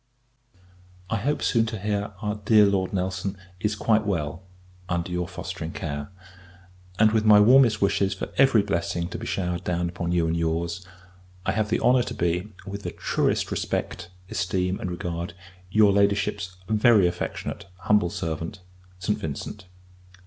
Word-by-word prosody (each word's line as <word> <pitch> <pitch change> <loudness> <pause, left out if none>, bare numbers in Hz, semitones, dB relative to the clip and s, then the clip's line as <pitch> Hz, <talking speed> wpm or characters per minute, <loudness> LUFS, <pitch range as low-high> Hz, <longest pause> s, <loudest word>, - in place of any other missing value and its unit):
I 115 - +2
hope 145 +8 -1
soon 115 -2 +2
to 110 0 -4
hear, 105 +1 -2
our 105 0 0
dear 105 0 +4
Lord 95 -2 +1
Nelson 95 +1 -2 0.2
is 105 +3 0
quite 110 +1 +2
well, 85 -5 -2 0.5
under 85 0 -1
your 90 0 -1
fostering 90 -2 -6
care; 75 -2 -4 0.9
and, 110 +1 +5
with 110 -1 +2
my 105 -1 +7
warmest 115 -1 +6
wishes 100 0 +2
for - - -5
every 130 -6 +5
blessing 85 -3 -2
to - - -6
be - - -6
showered 90 -2 -2
down 90 -1 -1
upon 85 0 -3
you 85 -1 +2
and 80 +1 0
your's, 85 +2 -1 0.6
I - - +2
have 110 -1 0
the - - 0
honour 125 0 +5
to - - -4
be, 90 +4 -1
with 100 0 -6
the - - -4
truest - - 0
respect, 85 - -3 0.2
esteem, 90 +1 -1
and 90 - -3
regard, 85 0 -4 0.3
your 105 +1 +5
Ladyship's 100 -2 +1
very 110 -2 +5
affectionate, 85 +1 -3
humble 105 -5 +3
servant, 85 +1 -4 0.4
ST. 95 +3 -1
VINCENT. 80 +6 -6
95 Hz, 155 wpm, -25 LUFS, 85-105 Hz, 0.9 s, my